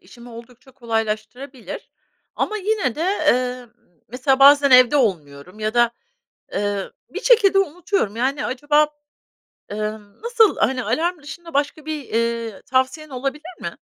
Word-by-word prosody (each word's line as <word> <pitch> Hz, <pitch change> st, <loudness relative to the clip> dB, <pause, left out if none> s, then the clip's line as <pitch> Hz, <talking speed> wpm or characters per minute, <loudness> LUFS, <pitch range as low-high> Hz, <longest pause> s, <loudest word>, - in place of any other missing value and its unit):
işimi 240 Hz, 0 st, -15 dB
oldukça 235 Hz, +3 st, -14 dB
kolaylaştırabilir 230 Hz, +2 st, -5 dB, 0.5 s
ama 430 Hz, -, -1 dB
yine 405 Hz, -, -1 dB
de, -, -, -7 dB
emm, 255 Hz, -, 0 dB, 0.4 s
mesela 260 Hz, +3 st, +1 dB
bazen 280 Hz, 0 st, +7 dB
evde 255 Hz, +3 st, +7 dB
olmuyorum 180 Hz, -, -2 dB
ya 215 Hz, +2 st, -2 dB
da, 240 Hz, -1 st, +4 dB, 0.7 s
ııı, 205 Hz, -1 st, -2 dB, 0.2 s
bir -, -, -6 dB
şekilde 410 Hz, -5 st, +5 dB
unutuyorum, 350 Hz, -, -1 dB
yani 270 Hz, +4 st, -1 dB
acaba, 295 Hz, +3 st, +2 dB, 0.8 s
ımm, 210 Hz, -, -6 dB
nasıl, 460 Hz, -3 st, +3 dB
hani, 255 Hz, +1 st, +1 dB
alarm 340 Hz, 0 st, -1 dB
dışında 330 Hz, +3 st, -10 dB
başka 290 Hz, +2 st, -1 dB
bir, 305 Hz, -4 st, -6 dB
ııı, 230 Hz, -2 st, -1 dB
tavsiyen 260 Hz, +4 st, -1 dB
olabilir 275 Hz, +7 st, -5 dB
mi? -, -, -6 dB
260 Hz, 130 wpm, -21 LUFS, 230-305 Hz, 0.8 s, bazen